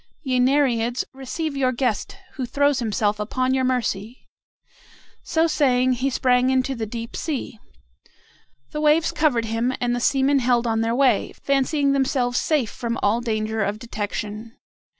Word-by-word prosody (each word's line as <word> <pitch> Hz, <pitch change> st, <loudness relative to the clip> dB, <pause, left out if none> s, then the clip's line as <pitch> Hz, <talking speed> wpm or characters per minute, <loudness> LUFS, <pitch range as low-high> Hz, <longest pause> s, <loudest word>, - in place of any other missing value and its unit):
Ye 255 Hz, -3 st, 0 dB
Nereids, 250 Hz, -3 st, +2 dB
receive 280 Hz, +3 st, -4 dB
your 260 Hz, -2 st, +1 dB
guest, 255 Hz, -, -2 dB, 0.2 s
who 260 Hz, -4 st, -4 dB
throws 285 Hz, +2 st, +2 dB
himself 210 Hz, -2 st, 0 dB
upon 255 Hz, +5 st, -1 dB
your 260 Hz, 0 st, +1 dB
mercy!" 245 Hz, -3 st, -2 dB, 1.0 s
So 320 Hz, 0 st, +1 dB
saying, 255 Hz, -5 st, +2 dB
he 255 Hz, +3 st, -1 dB
sprang 250 Hz, -1 st, +2 dB
into 260 Hz, +1 st, +1 dB
the 225 Hz, -3 st, -4 dB
deep 230 Hz, +2 st, -6 dB
sea. 280 Hz, -7 st, -4 dB, 1.1 s
The 300 Hz, -, -3 dB
waves 305 Hz, +2 st, +3 dB
covered 260 Hz, -7 st, +1 dB
him, 230 Hz, +3 st, -1 dB
and 240 Hz, 0 st, 0 dB
the -, -, -2 dB
seamen 275 Hz, +2 st, +2 dB
held 245 Hz, -1 st, +2 dB
on 225 Hz, -1 st, 0 dB
their 230 Hz, +1 st, 0 dB
way, 255 Hz, -5 st, +2 dB
fancying 280 Hz, +1 st, +1 dB
themselves 265 Hz, -3 st, +1 dB
safe 290 Hz, -9 st, 0 dB
from 235 Hz, -2 st, -3 dB
all 220 Hz, +4 st, +2 dB
danger 220 Hz, -1 st, -2 dB
of 205 Hz, +2 st, -2 dB
detection. 215 Hz, 0 st, -5 dB
250 Hz, 150 wpm, -23 LUFS, 230-275 Hz, 1.1 s, waves